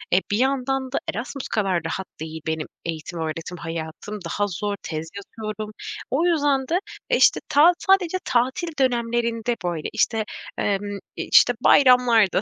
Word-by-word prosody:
E, -, -, +6 dB
bir 205 Hz, -, +2 dB
yandan 265 Hz, 0 st, 0 dB
da -, -, 0 dB, 0.2 s
Erasmus 260 Hz, +4 st, -5 dB
kadar 190 Hz, -6 st, 0 dB
rahat 190 Hz, +4 st, -3 dB
değil 160 Hz, 0 st, -6 dB
benim 160 Hz, -1 st, -2 dB, 0.2 s
eğitim-öğretim 165 Hz, +1 st, -4 dB
hayatım. 165 Hz, +5 st, -6 dB
Daha 205 Hz, +4 st, -1 dB
zor, 205 Hz, +2 st, -3 dB
tez 160 Hz, 0 st, -5 dB
yatıyorum. 215 Hz, +1 st, -6 dB, 0.4 s
O 300 Hz, +6 st, +2 dB
yüzden 290 Hz, -6 st, +2 dB
de, 350 Hz, +3 st, +1 dB, 0.3 s
işte, -, -, +5 dB
ta 320 Hz, +5 st, +6 dB
sadece 375 Hz, -2 st, +3 dB
tatil 255 Hz, +8 st, +1 dB
dönemlerinde 235 Hz, -2 st, 0 dB
böyle, 170 Hz, -3 st, -2 dB
işte, 220 Hz, -1 st, +1 dB, 0.3 s
emm, 205 Hz, 0 st, -1 dB, 0.2 s
işte, 245 Hz, -, +5 dB
bayramlarda, 250 Hz, -6 st, +5 dB
220 Hz, 135 wpm, -23 LUFS, 175-260 Hz, 0.4 s, E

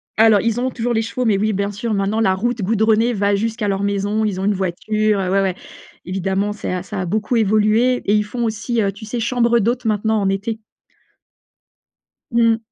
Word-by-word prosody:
Alors, 220 Hz, -1 st, +5 dB
ils 230 Hz, +1 st, 0 dB
ont 255 Hz, +1 st, -1 dB
toujours 240 Hz, 0 st, -2 dB
les 225 Hz, -, +1 dB
chevaux, 230 Hz, +3 st, -3 dB
mais, 210 Hz, -4 st, +3 dB
oui, 215 Hz, +1 st, 0 dB
bien 200 Hz, +1 st, -1 dB
sûr, 215 Hz, +2 st, -3 dB
maintenant, 200 Hz, +2 st, 0 dB
la 190 Hz, -4 st, +3 dB
route 235 Hz, +4 st, -2 dB
goudronnée 220 Hz, +3 st, +2 dB
va 200 Hz, -1 st, +1 dB
jusqu'à 220 Hz, +1 st, -2 dB
leur 195 Hz, 0 st, -1 dB
maison. 200 Hz, +2 st, 0 dB
Ils 195 Hz, -3 st, -2 dB
ont 190 Hz, -, -2 dB
une 205 Hz, -, +2 dB
voiture, 205 Hz, +3 st, 0 dB
heu, 185 Hz, -1 st, -1 dB
ouais, 195 Hz, +1 st, +2 dB
ouais. 190 Hz, -2 st, 0 dB, 0.5 s
Évidemment, 195 Hz, +2 st, -1 dB
c'est 205 Hz, -, -4 dB
à 180 Hz, -, -3 dB
ça 195 Hz, 0 st, -5 dB
a -, -, -2 dB
beaucoup 215 Hz, +6 st, -1 dB
évolué 215 Hz, +3 st, +3 dB
et 205 Hz, -, +2 dB
ils 210 Hz, -, +2 dB
font 240 Hz, +3 st, -4 dB
aussi, 225 Hz, +1 st, -1 dB
heu, 200 Hz, -2 st, +1 dB
tu 200 Hz, +3 st, -11 dB
sais, 235 Hz, +3 st, -4 dB
chambre 235 Hz, 0 st, +2 dB
d'hôtes, 240 Hz, +3 st, -1 dB
maintenant, 220 Hz, 0 st, +1 dB
en 195 Hz, -, +1 dB
été. 205 Hz, +3 st, -2 dB, 1.7 s
Mmh. 230 Hz, -1 st, +3 dB
215 Hz, 210 wpm, -19 LUFS, 200-230 Hz, 1.7 s, Alors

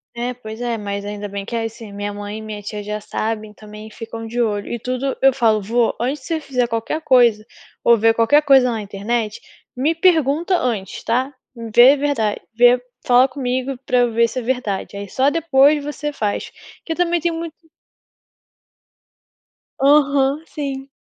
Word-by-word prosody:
É, 245 Hz, +1 st, -3 dB
pois 220 Hz, -1 st, -9 dB
é, 235 Hz, -1 st, -1 dB
mas 200 Hz, -1 st, -4 dB
ainda 205 Hz, 0 st, -5 dB
bem 200 Hz, 0 st, -6 dB
que 235 Hz, -, -5 dB
é 230 Hz, -, -1 dB
assim. 225 Hz, -1 st, -8 dB
Minha 205 Hz, 0 st, -4 dB
mãe 205 Hz, +1 st, -6 dB
e -, -, -7 dB
minha 215 Hz, -1 st, -7 dB
tia 210 Hz, +1 st, -6 dB
já 210 Hz, +1 st, -4 dB
sabem, 215 Hz, 0 st, -4 dB
também 210 Hz, 0 st, -11 dB
ficam 225 Hz, +1 st, -8 dB
de 240 Hz, +2 st, -2 dB
olho 205 Hz, -3 st, -1 dB
e 240 Hz, -, -3 dB
tudo. 255 Hz, +3 st, -2 dB
Eu 270 Hz, -1 st, +5 dB
falo: 225 Hz, -5 st, +2 dB
"Vô 230 Hz, +3 st, +1 dB
antes 260 Hz, +4 st, -2 dB
de -, -, -12 dB
você 325 Hz, -1 st, -1 dB
fazer 250 Hz, -4 st, -1 dB
qualquer 230 Hz, +7 st, -3 dB
coisa 240 Hz, -7 st, +4 dB, 0.4 s
ou 235 Hz, -1 st, +5 dB
ver 225 Hz, +1 st, +4 dB
qualquer 230 Hz, +6 st, +4 dB
coisa 270 Hz, -4 st, +5 dB
na 225 Hz, -, -3 dB
internet, 210 Hz, +2 st, -3 dB, 0.3 s
me 280 Hz, +6 st, +1 dB
pergunta 330 Hz, 0 st, +2 dB
antes, 215 Hz, -, -3 dB
tá? 255 Hz, +5 st, 0 dB, 0.4 s
Vê 255 Hz, +4 st, +8 dB
verdade, 270 Hz, -8 st, -1 dB
vê, 245 Hz, +2 st, +5 dB, 0.2 s
fala 250 Hz, +1 st, +5 dB
comigo 260 Hz, 0 st, -3 dB
pra 250 Hz, -, +2 dB
eu 240 Hz, -1 st, +2 dB
ver 230 Hz, +1 st, +3 dB
se 230 Hz, +3 st, -4 dB
é -, -, -4 dB
verdade, 230 Hz, -6 st, -3 dB
aí 200 Hz, -, -6 dB
só 265 Hz, +2 st, +2 dB
depois 295 Hz, -2 st, +3 dB
você 295 Hz, 0 st, -4 dB
faz", 210 Hz, -6 st, -3 dB, 0.3 s
que -, -, -5 dB
eu -, -, -11 dB
também 345 Hz, -1 st, +1 dB
tenho 340 Hz, -1 st, -1 dB
muito 330 Hz, -1 st, -6 dB, 2.2 s
Aham, 280 Hz, +1 st, +3 dB
sim. 275 Hz, -3 st, -6 dB
245 Hz, 185 wpm, -20 LUFS, 215-275 Hz, 2.2 s, Vê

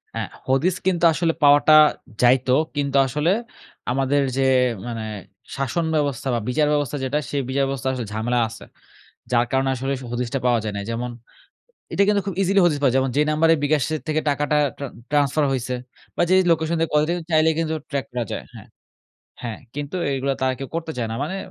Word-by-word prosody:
হ্যাঁ -, -, -3 dB, 0.2 s
হদিস 145 Hz, +8 st, +2 dB
কিন্তু 175 Hz, -2 st, +1 dB
আসলে 165 Hz, 0 st, +1 dB
পাওয়াটা 145 Hz, +2 st, +6 dB, 0.5 s
যাইত। 125 Hz, +1 st, +4 dB, 0.3 s
কিন্তু 140 Hz, -1 st, 0 dB
আসলে 150 Hz, +7 st, 0 dB, 0.6 s
আমাদের 135 Hz, +2 st, +1 dB, 0.2 s
যে -, -, +2 dB, 0.5 s
মানে, 115 Hz, -2 st, -4 dB, 0.5 s
শাসন 135 Hz, +5 st, -1 dB
ব্যবস্থা 140 Hz, -4 st, -1 dB
বা -, -, 0 dB
বিচার 150 Hz, +4 st, +2 dB
ব্যবস্থা 145 Hz, -1 st, -1 dB
যেটা, 135 Hz, +3 st, 0 dB
সেই 140 Hz, -, -1 dB
বিচারব্যবস্থায় 135 Hz, -1 st, -1 dB
আসলে 120 Hz, -4 st, -4 dB
ঝামেলা 120 Hz, +3 st, 0 dB
আছে। 115 Hz, -, -11 dB, 0.7 s
যার 120 Hz, 0 st, +3 dB
কারণে 135 Hz, 0 st, +1 dB
আসলে 135 Hz, +2 st, -3 dB
সে -, -, -8 dB
হদিসটা 125 Hz, +2 st, -2 dB
পাওয়া 120 Hz, -2 st, +3 dB
যায় 105 Hz, -1 st, -3 dB
নাই। 100 Hz, -, -4 dB
যেমন, 120 Hz, +1 st, -3 dB, 0.8 s
এটা 200 Hz, -, +3 dB
কিন্তু 205 Hz, -1 st, +3 dB
খুব 195 Hz, -, -3 dB
ইজিলি 195 Hz, +1 st, +3 dB
হদিস 155 Hz, -4 st, +2 dB
পাওয়া 130 Hz, -3 st, +3 dB
যায়। 135 Hz, -, +3 dB
যেমন 130 Hz, -1 st, -1 dB
যে 150 Hz, -, +5 dB
নাম্বারে 160 Hz, +2 st, +4 dB
bKash 145 Hz, -2 st, +1 dB
এর 155 Hz, -, -5 dB
থেকে 155 Hz, 0 st, 0 dB
টাকাটা 145 Hz, +1 st, +1 dB, 0.2 s
ট্রা 140 Hz, -, -5 dB, 0.2 s
ট্রান্সফার 145 Hz, +1 st, +2 dB
হইছে 125 Hz, -1 st, -2 dB, 0.4 s
বা -, -, +2 dB
যেই 185 Hz, 0 st, +5 dB
লোকেশন 160 Hz, 0 st, +1 dB
দিয়ে 165 Hz, -1 st, 0 dB
কল 150 Hz, -, +4 dB
যায় 175 Hz, -, 0 dB
চাইলেই 160 Hz, 0 st, +4 dB
কিন্তু 160 Hz, -1 st, -1 dB, 0.2 s
ট্র্যাক 140 Hz, -2 st, -1 dB
করা 120 Hz, -1 st, -2 dB
যায় -, -, -4 dB
হ্যাঁ। -, -, -12 dB, 0.8 s
হ্যাঁ 115 Hz, -3 st, -5 dB, 0.2 s
কিন্তু 145 Hz, +5 st, -4 dB, 0.2 s
এইগুলা 135 Hz, +1 st, -1 dB
তারা 130 Hz, 0 st, +2 dB
কেউ 135 Hz, -, -6 dB
করতে 165 Hz, -1 st, -4 dB
চায় 115 Hz, -2 st, -1 dB
না। -, -, -3 dB
মানে 180 Hz, +6 st, -4 dB
140 Hz, 195 wpm, -22 LUFS, 125-155 Hz, 0.8 s, পাওয়াটা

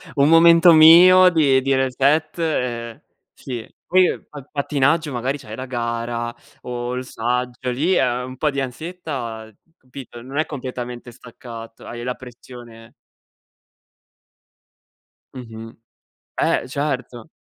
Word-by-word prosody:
un 140 Hz, +1 st, +3 dB
momento 170 Hz, +1 st, +7 dB
mio 180 Hz, +4 st, +8 dB
di 140 Hz, -6 st, +3 dB
di 135 Hz, +1 st, 0 dB
reset 140 Hz, +5 st, +1 dB
e 120 Hz, -7 st, -3 dB, 0.3 s
sì. 120 Hz, -4 st, -7 dB, 0.2 s
Poi, 185 Hz, 0 st, +4 dB
uhm, -, -, -6 dB
pa 145 Hz, -2 st, -10 dB
pattinaggio, 145 Hz, +2 st, 0 dB
magari, 130 Hz, +3 st, -2 dB
c'hai 110 Hz, -6 st, -10 dB
la 130 Hz, -, -6 dB
gara 120 Hz, -1 st, -4 dB, 0.3 s
o 120 Hz, 0 st, -5 dB
il 130 Hz, 0 st, -5 dB
saggio. 125 Hz, +2 st, -3 dB
Lì, 160 Hz, +9 st, 0 dB
ehm, 125 Hz, -3 st, 0 dB
un 130 Hz, 0 st, -10 dB
po' 150 Hz, -, 0 dB
di 140 Hz, -1 st, -3 dB
ansietta, 130 Hz, -6 st, -6 dB, 0.3 s
capito, 125 Hz, -2 st, -12 dB
non 135 Hz, +4 st, -8 dB
è 155 Hz, -, +1 dB
completamente 125 Hz, -3 st, -7 dB
staccato, 115 Hz, -1 st, -12 dB
hai 120 Hz, 0 st, -8 dB
la 125 Hz, 0 st, -3 dB
pressione 120 Hz, -2 st, -13 dB, 2.4 s
Mh-mh, 115 Hz, -3 st, -10 dB, 0.6 s
eh, -, -, 0 dB
certo. 135 Hz, -2 st, -4 dB
130 Hz, 125 wpm, -21 LUFS, 120-150 Hz, 2.4 s, mio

